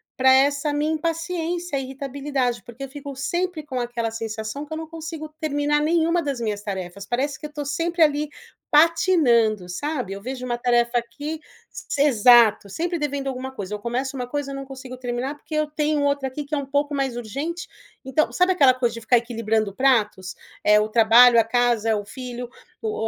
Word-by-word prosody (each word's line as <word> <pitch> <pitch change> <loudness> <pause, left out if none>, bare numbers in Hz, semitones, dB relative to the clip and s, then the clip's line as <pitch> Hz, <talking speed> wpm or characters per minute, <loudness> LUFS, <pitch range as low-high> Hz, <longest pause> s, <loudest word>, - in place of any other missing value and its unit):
pra 260 0 +5
essa 280 +2 +3
minha 300 +2 0
impaciência, 335 0 -2
irritabilidade, 270 -2 -3
porque 240 +3 -10
eu - - -4
fico 280 -1 -8
sempre 345 +4 -2
com 255 -3 -3
aquela 235 -2 -2
sensação 225 +4 -5
que 300 - -14
eu 315 - -3
não 320 - -5
consigo 320 -1 -7
terminar 295 -1 +1
nenhuma 335 +2 +2
das 280 -5 -3
minhas 210 -3 -2
tarefas. 195 -1 -5
Parece 265 +4 -2
que 300 - -6
eu - - -19
tô 295 -1 -4
sempre 330 +4 +1
ali 295 0 +1 0.4
patinando, 295 - +4
sabe? 250 - -3
Eu 200 - -8
vejo 255 +2 -5
uma 240 -1 -2
tarefa 240 0 +2
aqui 290 +7 -6 0.3
S - - -4
exato! 235 -6 +5
Sempre 345 - -2
devendo 285 -2 -2
alguma 265 0 -4
coisa. 205 -5 -6
Eu 210 - -3
começo 255 +5 -3
uma 250 -1 -4
coisa, 285 +1 -3
eu - - -5
não 275 0 -6
consigo 260 -1 -9
terminar, 250 +3 -3
porque 305 +1 -8
eu 305 0 +1
tenho 300 -1 0
outra 280 -1 +1
aqui 290 +3 -5
que 285 - -11
é - - -1
um 280 - -3
pouco 285 +1 -1
mais 270 -3 -1
urgente. 285 +10 -4 0.4
Então, 265 +4 +1
sabe 365 +1 +3
aquela 275 -7 +5
coisa 240 -2 0
de 230 - -7
ficar 240 +2 +4
equilibrando 225 -3 -1
pratos? 210 -8 +1 0.3
É 210 0 +6
o 215 +1 0
trabalho, 235 +2 +7
a - - +5
casa, 235 -1 +1
é 220 - +3
o 205 -1 -4
filho, 245 +1 -7 0.3
o 430 - -2
265 Hz, 200 wpm, -23 LUFS, 235-295 Hz, 0.4 s, trabalho